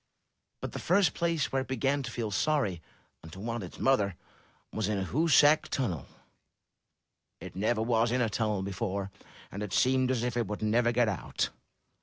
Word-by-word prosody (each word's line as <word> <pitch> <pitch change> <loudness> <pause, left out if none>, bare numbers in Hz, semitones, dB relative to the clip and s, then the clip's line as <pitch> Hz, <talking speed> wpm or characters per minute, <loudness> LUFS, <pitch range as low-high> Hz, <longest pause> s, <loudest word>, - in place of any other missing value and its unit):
But - - -4
the - - -5
first 180 -2 +3
place 170 -3 0
where 135 - +1
it 130 - -7
began 135 +2 0
to 125 - -5
feel 115 -3 -3
sorry, 100 - 0 0.4
and 80 - -12
to 95 - -9
want 115 +1 -3
its 90 - -9
mother, 105 -8 +2 0.6
was 110 -3 -1
in 100 -3 -1
Hoosac 150 - +4
Tunnel. 95 - -2 1.3
It - - -9
never 110 +3 +1
was 115 0 +2
in 125 - +1
a 120 - +2
tunnel 105 -2 -1
before, 100 0 -3 0.4
and 100 - -6
it 105 -3 -4
seemed 130 0 +3
as 125 -3 0
if 125 -1 -1
it 120 -4 0
would 105 +1 -4
never 115 +2 +3
get 120 0 +2
out. 100 -4 -2
115 Hz, 180 wpm, -30 LUFS, 100-130 Hz, 1.3 s, Hoosac